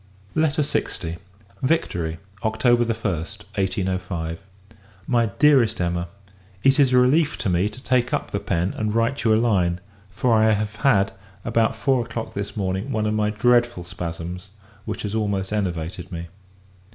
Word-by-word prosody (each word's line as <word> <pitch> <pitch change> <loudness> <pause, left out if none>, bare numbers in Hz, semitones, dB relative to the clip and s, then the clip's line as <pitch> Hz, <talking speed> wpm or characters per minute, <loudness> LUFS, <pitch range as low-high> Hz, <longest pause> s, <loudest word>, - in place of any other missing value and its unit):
LETTER 155 -1 +2
LX. 85 - -2 0.4
Victory, 85 - 0 0.3
October 120 +2 +3
1st, 105 -3 -3
1805. 90 -3 -2 0.6
MY 120 -2 +2
DEAREST 140 -7 +4
EMMA, 85 0 -1 0.6
It 135 +2 +4
is 135 -3 +5
a 125 - +5
relief 145 +5 +3
to 105 - -1
me, 90 +3 +2
to 125 +5 -12
take 125 -1 +1
up - - -2
the 100 - -1
pen, 95 -2 -1
and 110 0 -1
write 115 +4 +1
you 115 - +3
a 110 - +5
line; 95 -7 +2 0.3
for 115 +4 +1
I 110 0 +5
have 105 +1 -2
had, 105 -9 +3 0.3
about 115 -1 +2
four 130 -3 +1
o'clock 115 -1 -5
this 100 +2 -5
morning, 95 +5 -2
one 110 -3 0
of 105 - +1
my 105 -1 +1
dreadful 120 -2 +2
spasms, 90 +1 -6 0.4
which - - -4
has 105 -1 -3
almost 100 -3 -1
enervated 90 -3 -3
me. 85 -1 -6
105 Hz, 155 wpm, -23 LUFS, 90-120 Hz, 0.6 s, is